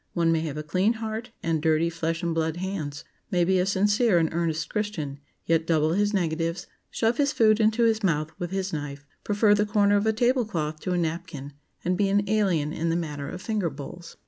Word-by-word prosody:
One 170 -1 +2
may 165 - +2
have 155 -2 -4
a 150 - -3
clean 185 +9 +1
heart 220 +1 -5
and 165 -2 0
dirty 160 +1 +2
flesh 165 0 -2
and 170 -1 0
blood 160 0 -1
hands; 160 -6 -4 0.3
may 180 -4 +2
be 190 +1 +3
a 180 - +1
sincere 205 +1 +3
and 165 -1 +2
earnest 160 -2 -1
Christian, 160 -10 -3 0.3
yet 165 0 +1
double 155 -1 +2
his 205 +2 +2
negatives, 165 -2 -1 0.2
shove 225 +1 0
his 285 -1 +2
food 220 -3 +4
into 220 +2 +3
his 225 -1 +3
mouth 155 -5 0
with 175 - -3
his 190 0 -3
knife, 145 -1 -5 0.2
prefer 205 0 +3
the 210 0 +3
corner 205 -1 +3
of 205 +2 0
a - - +5
table 245 +3 +2
cloth 155 -7 -3
to 185 - -2
a - - +1
napkin, 160 -4 -4 0.3
and 180 +2 0
be 200 -1 +3
an 205 +1 +2
alien 185 -8 +1
in 165 +1 -1
the 165 - +1
matter 150 -4 -3
of 180 - -7
finger 210 -6 0
bowls. 150 +4 -10
175 Hz, 220 wpm, -26 LUFS, 160-205 Hz, 0.3 s, a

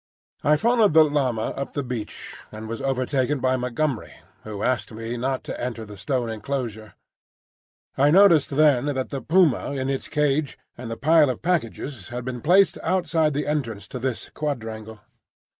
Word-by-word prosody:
I 150 - +5
followed 220 -3 +3
the 160 - +9
llama 135 -7 0
up 140 - -5
the 145 - -2
beach, 120 -4 -6 0.2
and 110 +1 -8
was 115 +2 -5
overtaken 135 +1 0
by 130 0 +2
Montgomery, 125 0 -2 0.3
who 105 -2 -6
asked 125 -1 0
me 115 +2 -5
not 130 +2 -2
to - - -6
enter 115 -2 -4
the 105 0 -10
stone 125 +4 -2
enclosure. 110 -2 -4 1.0
I 140 +2 +4
noticed 170 -3 +6
then 145 -2 +3
that 130 -1 -3
the 135 -2 -3
puma 160 -2 +2
in 135 0 -1
its 135 - -3
cage 150 -1 0 0.2
and 120 -1 -8
the 115 - -4
pile 155 +1 +4
of 130 - -4
packages 140 - -2
had 120 0 -5
been 125 -2 -4
placed 190 - +4
outside 165 -4 +1
the 145 - -1
entrance 115 -10 -3
to 125 - -6
this 130 -1 -3
quadrangle. 110 -7 -5
130 Hz, 170 wpm, -24 LUFS, 115-150 Hz, 1.0 s, the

